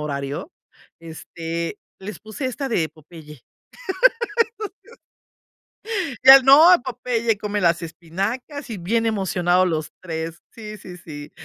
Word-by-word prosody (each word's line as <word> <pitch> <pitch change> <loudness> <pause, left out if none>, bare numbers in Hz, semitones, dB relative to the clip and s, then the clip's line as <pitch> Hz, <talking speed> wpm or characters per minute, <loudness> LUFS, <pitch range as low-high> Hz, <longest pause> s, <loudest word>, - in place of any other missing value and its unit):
horario. 140 - -4 0.5
Este, 165 +2 -6 0.2
les 205 +2 -7
puse 220 +5 -5
esta 270 +2 -4
de 170 -9 0
Popeye. 155 -3 -14 2.8
Ya 270 +1 +11
no. 300 +7 +8
Popeye 235 -3 -1
come 205 -1 -3
las 170 -1 +2
espinacas, 195 - -5
y 220 - -5
bien 225 +6 0
emocionados 185 -4 +1
los 155 -2 -3
3. 165 -1 -5
Sí, 215 -2 -9
sí, 180 -2 -11
sí. 145 -4 -10
185 Hz, 110 wpm, -22 LUFS, 165-230 Hz, 2.8 s, Ya